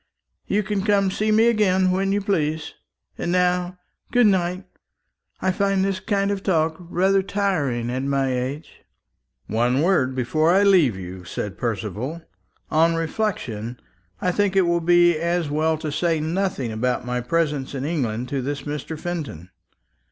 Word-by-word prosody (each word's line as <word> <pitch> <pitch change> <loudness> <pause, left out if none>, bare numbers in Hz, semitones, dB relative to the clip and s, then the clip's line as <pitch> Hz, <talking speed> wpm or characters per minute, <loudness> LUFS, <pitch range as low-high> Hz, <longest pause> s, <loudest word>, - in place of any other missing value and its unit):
You 210 +1 +1
can 205 -1 -1
come 205 0 +3
and 190 -1 0
see 215 +2 0
me 220 +2 +5
again 190 -5 +3
when 195 +1 0
you 205 +1 +1
please. 160 -6 -1 0.5
And 175 - -1
now 180 0 +1 0.3
good 245 -1 +4
night. 185 -1 +1 0.8
I 190 - +3
find 195 0 +1
this 195 -1 -1
kind 200 -1 0
of 200 -1 -2
talk 160 -4 +1
rather 185 +3 +1
tiring 160 - -1
at 130 +1 -2
my 135 -1 0
age." 130 +5 -5 0.6
"One 120 +6 +1
word 140 -8 +2
before 155 +6 +1
I 190 +3 +5
leave 175 - +4
you," 90 0 -8
said 95 +3 -5
Percival. 115 - -4 0.5
"On 165 +2 +3
reflection, 145 - -3 0.4
I 180 - +1
think 200 +1 +1
it 190 - +5
will 170 0 +1
be 175 -1 +4
as 170 -2 -1
well 155 +1 +1
to 155 -1 -4
say 160 +1 0
nothing 160 - -1
about 125 +3 -1
my 125 0 -2
presence 145 0 -1
in 135 0 -3
England 125 -7 -2
to 135 -1 -1
this 140 +1 -4
Mr. 150 +2 -5
Fenton. 145 - -5
165 Hz, 160 wpm, -23 LUFS, 130-190 Hz, 0.8 s, me